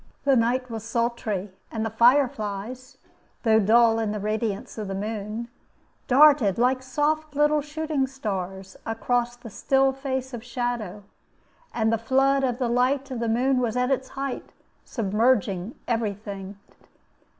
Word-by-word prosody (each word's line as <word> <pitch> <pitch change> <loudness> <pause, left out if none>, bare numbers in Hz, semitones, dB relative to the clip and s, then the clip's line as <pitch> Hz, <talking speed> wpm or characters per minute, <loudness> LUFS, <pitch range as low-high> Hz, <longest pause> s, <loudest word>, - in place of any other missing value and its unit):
The 275 -1 +4
night 250 +1 +1
was 225 -2 -5
sultry, 225 -4 -2 0.2
and 225 -1 -2
the 225 - -3
fire 250 +5 +5
flies 235 +1 -6 0.5
(though 220 -2 +5
dull 225 +2 +4
in 220 -2 -1
the 210 - -3
radiance 215 +1 -3
of 210 - -4
the 195 - -4
moon) 215 +2 -4 0.6
darted, 275 -7 +6
like 255 +2 +2
soft 295 +3 -1
little 295 +1 +3
shooting 300 -2 -2
stars, 195 -7 -5
across 240 +2 -1
the 240 -2 -11
still 270 +5 +2
face 265 -1 -4
of 230 -2 -6
shadow, 240 -5 -3 0.7
and 225 -1 +1
the 225 - +1
flood 270 +3 +2
of 250 -2 0
the 250 -2 0
light 260 +3 +1
of 250 - -3
the 230 -1 -1
moon 255 +3 +2
was 240 -1 -1
at 250 +1 +1
its 260 -1 -1
height, 275 -1 -4 0.3
submerging 210 -2 0
every 225 -4 0
thing. 200 -1 -8
235 Hz, 150 wpm, -25 LUFS, 215-265 Hz, 0.7 s, darted